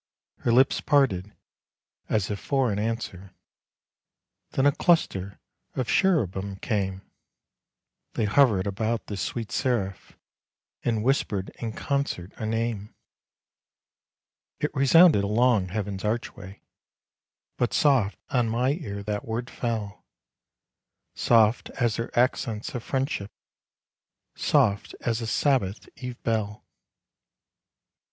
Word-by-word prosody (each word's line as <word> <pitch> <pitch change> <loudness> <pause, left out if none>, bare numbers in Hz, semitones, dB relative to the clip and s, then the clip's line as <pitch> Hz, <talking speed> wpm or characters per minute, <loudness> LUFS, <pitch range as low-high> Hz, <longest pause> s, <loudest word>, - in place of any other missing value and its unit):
Her 120 - 0
lips 130 +3 +4
parted, 105 -10 +2 0.7
as 105 -2 0
if 100 - -3
for 135 -4 +1
an 100 - -1
answer 100 -4 -4 1.2
Then 135 - +2
a 145 - +6
cluster 100 - +1 0.4
of 125 -3 -2
cherubim, 100 - +1
came 95 -2 -2 1.1
They 110 - 0
hovered 105 -3 +4
about 110 +3 -1
this 100 -3 -5
sweet 115 +4 -4
seraph, 110 -8 -2 0.7
And 115 -3 0
whispered 110 -7 0
in 115 -2 -4
concert 140 -11 -2
a 110 - -3
name. 115 -2 -2 1.6
It - - -1
resounded 140 - +6
along 110 -1 +3
Heaven's 100 0 -4
archway, 105 -3 -4 0.9
But 120 - +1
soft 130 -9 +3
on 120 -3 +2
my 125 +4 +1
ear 100 - -5
that 105 0 -3
word 115 +2 -4
fell, 110 -4 -4 1.1
Soft 115 -1 +3
as 120 -3 +1
her 115 - -3
accents 120 -3 0
of 125 - -3
friendship, 130 -6 -2 1.0
Soft 100 0 +1
as 115 0 -1
a 115 - -3
Sabbath 115 -5 +1
eve 125 -1 -7
bell. 110 -2 -2
110 Hz, 110 wpm, -26 LUFS, 100-125 Hz, 1.6 s, a